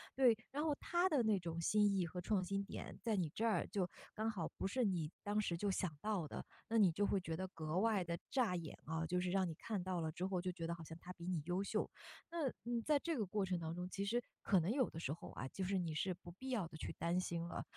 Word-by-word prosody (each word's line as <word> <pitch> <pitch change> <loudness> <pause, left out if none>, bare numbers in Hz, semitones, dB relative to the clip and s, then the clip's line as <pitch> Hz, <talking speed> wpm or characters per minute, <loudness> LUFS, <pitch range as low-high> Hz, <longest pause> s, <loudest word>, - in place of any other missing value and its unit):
对， 255 -4 +7 0.2
然 290 +2 0
后 305 -2 +2
他 350 +1 +3
的 285 -8 +4
那 215 -3 +4
种 170 -1 -3
新 205 +3 +4
意 185 -2 +2
和 180 +2 -5
创 190 +1 +2
新 195 +2 0
点 - - -6
在 225 -3 +1
你 175 -5 +1
这 225 - 0
儿 225 - +3
就 190 -3 0 0.3
刚 220 +1 +1
好 185 -7 -2
不 - - 0
是 250 +6 +1
你 175 -7 +1
当 205 +1 +1
时 185 -5 +1
就 205 +4 +1
想 180 -4 0
到 205 -7 0
的， - - -5 0.2
那 230 - +2
你 200 -5 +7
就 205 +5 +2
会 200 - +3
觉 165 -3 -3
得 190 +1 -2
格 160 -2 -2
外 215 -2 +3
地 170 0 -2
炸 240 -9 +3
眼 165 -4 -4
啊， 160 +1 -1
就 180 +2 +1
是 180 - 0
让 190 0 +3
你 165 - -3
看 210 +3 -2
到 185 -2 -1
了 160 -1 -1
之 180 +4 -2
后 185 -2 0
就 185 0 -1
觉 170 -2 -4
得 170 - 0
好 170 - -8
像 160 +1 -8
他 180 +1 -8
比 170 - -9
你 180 -4 +1
优 180 +3 +1
秀。 - - 0 0.4
那， 325 -5 +1 0.2
嗯， 240 -1 0
在 300 -2 +5
这 330 +2 -1
个 215 - +1
过 195 +1 0
程 185 -1 0
当 160 -1 -3
中， 180 +1 -3
其 195 - -2
实 235 +4 +2 0.2
可 195 - +5
能 170 +5 +1
有 260 -1 +3
的 165 - -6
时 145 -3 -1
候 165 - -8
啊， 130 - -4
就 190 - -3
是 190 +1 +1
你 170 -3 0
是 180 +5 +1
不 175 0 -11
必 260 +9 -7
要 220 -9 +1
地 160 - -11
去 - - -4
担 170 +2 +2
心 170 -2 -1
了。 - - -3
185 Hz, 305 characters per minute, -40 LUFS, 170-215 Hz, 0.4 s, 对